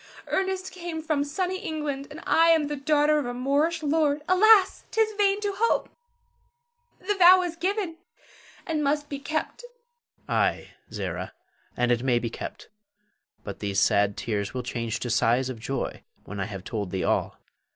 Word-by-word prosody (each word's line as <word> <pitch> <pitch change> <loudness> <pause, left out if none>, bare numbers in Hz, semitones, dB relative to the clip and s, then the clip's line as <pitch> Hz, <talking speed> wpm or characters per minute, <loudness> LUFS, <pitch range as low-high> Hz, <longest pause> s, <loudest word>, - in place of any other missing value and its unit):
Ernest 380 0 -1
came 340 -3 -6
from 305 -3 0
sunny 365 +6 -2
England, 295 -4 -4
and 310 - -10
I 330 +1 +4
am 325 -2 +5
the 295 0 -3
daughter 295 +1 +2
of 280 - -3
a 245 - -4
Moorish 290 +6 0
lord. 300 -1 +1
Alas, 390 +1 +5
'tis 440 -1 +1
vain 405 -1 +2
to 410 -1 -1
hope! 460 +2 +1 1.1
The 395 +3 -1
vow 370 -1 +7
is 345 -2 -4
given, 365 -1 -2 0.7
and 310 -3 -1
must 290 +1 0
be 280 - -5
kept. 310 - -3 0.6
Her. - - -3
Ay, - - 0 0.2
Zara, - - -4 0.4
and 125 0 +2
it 120 -1 +2
may 125 -2 +2
be 120 -1 -2
kept; - - -8 0.8
but 100 - -7
these 100 -2 -1
sad 100 +1 +2
tears 105 0 -3
will 125 - -2
change 115 -2 -3
to 120 - -2
sighs 120 +3 +2
of 120 - -9
joy 135 +4 -4 0.2
when 105 0 -8
I 95 - -1
have 100 -3 -7
told 105 -3 -4
thee 95 0 -2
all. - - 0
295 Hz, 170 wpm, -26 LUFS, -, 1.1 s, vow